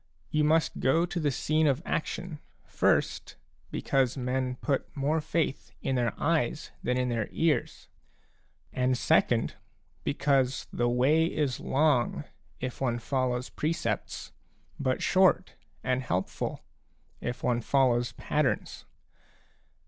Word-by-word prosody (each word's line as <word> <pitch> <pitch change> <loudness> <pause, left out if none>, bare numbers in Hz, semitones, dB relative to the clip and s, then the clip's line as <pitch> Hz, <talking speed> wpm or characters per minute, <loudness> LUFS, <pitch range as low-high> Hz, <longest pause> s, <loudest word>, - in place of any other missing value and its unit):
You 155 0 +2
must 160 +2 +2
go 160 +6 +3
to 175 0 -3
the 150 -3 +1
scene 155 +3 +1
of 140 +3 +1
action, 165 0 -3 0.3
first, - - +1 0.3
because 135 -1 +1
men 125 0 -1
put 135 +1 -1
more 150 +3 +1
faith 150 -2 -1
in 135 - 0
their 120 -2 0
eyes 155 -3 0
than 125 +1 0
in 125 0 +1
their 115 -3 -1
ears, 165 -2 0 0.9
a - - -6
and 125 0 +2
second, - - +2 0.5
because 135 -2 +1
the 120 0 +1
way 135 +7 +3
is 145 -7 -1
long 140 -4 +2 0.4
if 130 0 -5
one 120 -3 +1
follows 125 +1 -1
precepts, 160 +2 -2 0.5
but 130 -1 0
short 190 -1 +3 0.3
and 130 0 +1
helpful, 95 -7 -2 0.6
if 120 0 -4
one 120 -1 +1
follows 120 -2 +2
patterns. - - -1
135 Hz, 125 wpm, -29 LUFS, 125-155 Hz, 0.9 s, go